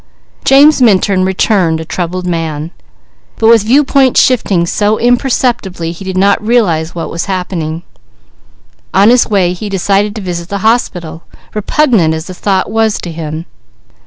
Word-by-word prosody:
James 285 +1 +5
Minturn 195 -4 +3
returned 185 -3 +1
a 160 - -6
troubled 180 +2 -4
man, 165 -2 -3 0.6
but 225 - +2
with 230 -1 +6
viewpoint 265 +3 +2
shifting 200 -9 +2
so 210 +4 0
imperceptibly 240 -8 0
he 170 +3 -10
did 190 -1 -4
not 200 +2 +2
realize 175 -9 0
what 165 - -5
was 170 - -3
happening. 175 -4 -4 1.1
On 200 +4 +5
his 250 -1 +3
way 190 -5 +1
he 205 +4 -6
decided 200 +2 0
to 220 - -5
visit 175 -2 -5
the 200 0 -4
hospital, 175 -8 -1 0.3
repugnant 210 - +1
as 160 +1 -6
the 185 - -8
thought 190 0 -1
was 220 -1 +1
to 175 - -7
him. 160 0 -6
190 Hz, 150 wpm, -12 LUFS, 170-220 Hz, 1.1 s, with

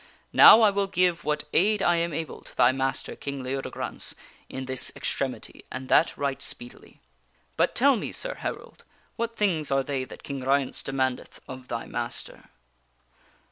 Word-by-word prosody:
Now 225 - +10
I 215 -2 +6
will 200 0 0
give 180 -3 +1
what 150 0 0
aid 210 +2 +3
I 175 -1 +3
am 170 0 0
able 160 +1 -5
to - - -15
thy 125 0 +6
master, 135 0 -2
King 140 -2 -6
Leodegrance, 135 +1 -4 0.3
in 130 0 -5
this 130 -1 -2
extremity, - - -4
and 130 0 -6
that - - +4
right 140 -1 -2
speedily. 120 0 -8 0.5
But - - +1
tell 275 +2 +5
me, 220 - -4
sir - - -2
herald, - - -6 0.3
what 230 0 -3
things 175 -9 0
are 135 0 +2
they 135 -2 -2
that - - -12
King 140 -2 -5
Ryence 135 0 +1
demandeth 130 -2 -2
of 130 -1 -9
thy 115 -1 -4
master?" 120 -1 -6
140 Hz, 165 wpm, -26 LUFS, 130-180 Hz, 0.5 s, Now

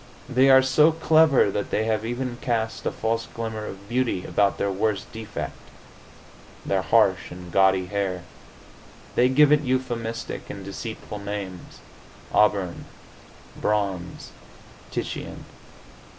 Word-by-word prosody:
They 130 0 +4
are 130 0 +8
so 150 +4 +5
clever 160 -7 +4
that 100 - -3
they 110 - 0
have 110 -1 0
even 120 +1 -3
cast 115 -2 -1
a - - 0
false 115 +1 -2
glamour 110 -2 -5
of 100 +1 -9
beauty 120 -5 0
about 100 -1 +1
their 100 - 0
worst 100 +1 -1
defect 110 -1 -5 1.1
their - - +1
harsh - - +3
and 90 0 -10
gaudy 95 0 +4
hair. 95 -2 -2 0.9
They 125 +1 +4
give 145 +2 +5
it 150 -1 +5
euphemistic 120 -4 -3
and - - -7
deceitful 105 - -6
names 100 -3 -7 0.5
auburn, 100 -4 +2 0.8
bronze, 100 -4 -2 0.6
Titian. - - -5
110 Hz, 120 wpm, -24 LUFS, 100-130 Hz, 1.1 s, are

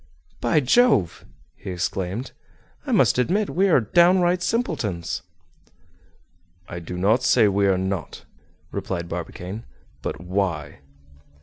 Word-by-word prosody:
"By 120 +6 +2
Jove!" 135 - +3 0.3
he - - -9
exclaimed, 95 +6 -3 0.6
"I - - -2
must - - +4
admit 195 +11 +1
we 195 +2 +2
are 165 - +5
down 175 - +4
right 175 0 +2
simpletons!" 140 - -2 1.5
"I 85 - -6
do 85 +1 -7
not 105 +7 +3
say 125 -3 +4
we 100 0 +2
are 95 -1 +3
not," 95 -2 -4 0.5
replied 95 -3 -4
Barbicane; 90 +5 -6 0.4
"but - - -4
why?" 90 -5 -2
100 Hz, 120 wpm, -23 LUFS, -, 1.5 s, are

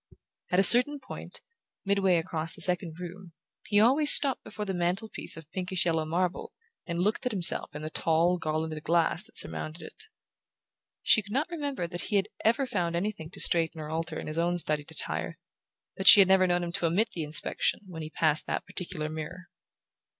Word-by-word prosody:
At 180 - 0
a 195 - +4
certain 250 +8 +8
point, 260 - -10 0.4
midway 195 -2 +1
across 165 -1 -4
the - - -10
second 175 -3 -3
room, 180 0 -10 0.3
he 205 - +2
always 275 +7 +5
stopped 275 -3 +4
before 210 - -7
the 195 - -4
mantel 180 +5 -2
piece - - -2
of 160 -1 -13
pinkish 185 -1 -3
yellow 160 -2 -1
marble 175 +3 -3 0.3
and 170 -1 -4
looked 210 +2 -1
at - - -2
himself 180 -6 +3
in 150 - -7
the 155 - -6
tall 170 +3 0
garlanded 155 -1 -4
glass 165 0 0
that 220 +2 -14
surmounted 160 +2 -1
it. 440 - -12 1.0
She 215 - +4
could 205 0 -14
not 285 +8 -2
remember 285 - -4
that 175 0 -7
he 210 - -3
had 200 +1 0
ever 235 +5 +1
found 175 -8 -3
anything 175 -3 -4
to - - -12
straighten 165 -1 +1
or 155 0 -7
alter 165 0 -4
in - - -8
his 155 +2 -3
own 175 +1 0
studied 150 -3 -1
attire, 160 - -5 0.6
but 190 - -4
she - - +11
had 195 - +6
never 190 -1 +3
known 175 0 0
him 170 - -5
to 170 - -2
omit 210 +8 0
the 170 - -6
inspection 150 +6 +2
when 175 -4 -9
he 155 - -7
passed 155 -1 0
that - - -4
particular 170 -4 -5
mirror. 160 +3 -8
175 Hz, 200 wpm, -27 LUFS, 160-200 Hz, 1.0 s, she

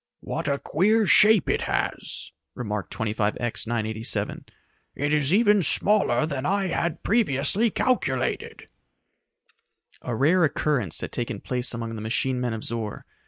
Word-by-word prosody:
"What - - -4
a 140 -1 +1
queer 210 +10 +2
shape 210 0 +5
it - - +1
has," - - -3 0.2
remarked 105 -4 -4
25X 110 +2 -2
987. 110 -1 -2 0.5
"It 145 +2 -1
is 145 -1 +2
even 210 0 +4
smaller 200 -2 +3
than 140 -4 -4
I 195 +3 0
had 170 -1 -2
previously 205 - +2
calculated." 190 - -1 1.3
A 125 - -3
rare 165 +9 +3
occurrence 140 - 0
had - - -5
taken 120 -3 -4
place 125 +1 -2
among 115 0 -5
the 110 - -6
machine 125 +3 -1
men 120 -2 -1
of 110 - -5
Zor. 110 -3 -4
135 Hz, 135 wpm, -25 LUFS, 115-185 Hz, 1.3 s, shape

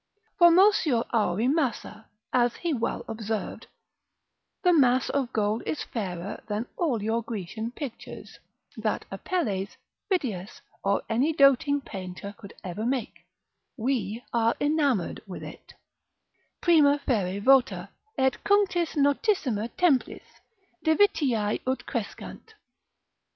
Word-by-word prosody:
Formosior 345 - +5
auri 220 0 +1
massa, 255 -7 -1 0.3
as 245 -1 +3
he 340 -3 -2
well 230 -3 -2
observed, 220 -1 -4 1.0
the 360 -1 +5
mass 255 -5 +3
of 270 -3 -1
gold 215 0 0
is 310 - -2
fairer 190 -4 -5
than 210 +2 -2
all 255 - 0
your 225 +2 0
Grecian 220 0 -5
pictures, 255 -1 -8 0.4
that - - -2
Apelles, 205 - -2 0.3
Phidias, 220 - -2 0.2
or 200 0 +1
any 255 +8 +1
doting 280 0 +4
painter 190 -2 -7
could 200 -1 -13
ever 185 +3 -5
make: 250 0 -3 0.5
we 240 -2 -2
are 230 -1 +2
enamoured 290 - +1
with 185 - -7
it, - - -11 0.9
Prima 300 -5 +5
fere 200 -6 0
vota, 260 +3 +3 0.3
et 265 0 +2
cunctis 390 -5 +2
notissima 280 - +1
templis, 305 -8 +2 0.6
Divitiae 285 - +2
ut 260 +1 -1
crescant. 235 - -6
245 Hz, 110 wpm, -27 LUFS, 215-290 Hz, 1.0 s, Formosior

